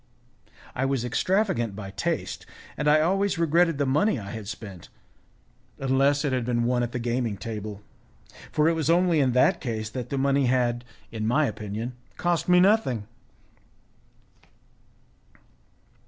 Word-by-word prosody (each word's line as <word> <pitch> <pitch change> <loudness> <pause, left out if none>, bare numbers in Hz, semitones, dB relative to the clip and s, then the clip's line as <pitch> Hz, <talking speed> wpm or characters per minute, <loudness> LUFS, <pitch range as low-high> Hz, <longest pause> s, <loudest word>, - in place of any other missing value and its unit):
I 130 - -2
was 135 -3 0
extravagant 170 - 0
by 100 -2 -7
taste, 100 - -3 0.3
and 150 - -2
I 155 +1 +5
always 195 +3 +1
regretted 165 0 +2
the 140 - +1
money 150 +7 +2
I 100 -3 -7
had 110 -3 -7
spent, 100 -5 -8 0.9
unless 135 +2 +2
it 140 - 0
had 125 -2 0
been 120 0 0
won 120 +1 +1
at 120 -1 -2
the - - -3
gaming 120 -3 -1
table, 105 -2 -6 0.7
for 150 +1 +2
it 165 - +4
was 160 -1 -1
only 175 -1 +3
in 130 -3 +2
that 125 - +3
case 110 -3 -4
that 125 -1 -5
the 140 - -2
money 140 0 +2
had, 120 -1 +1 0.3
in 110 -1 -3
my 145 +6 +3
opinion, 110 +1 -4 0.2
cost 175 0 0
me 180 0 +6
nothing. 180 - +3
130 Hz, 150 wpm, -26 LUFS, 115-155 Hz, 0.9 s, me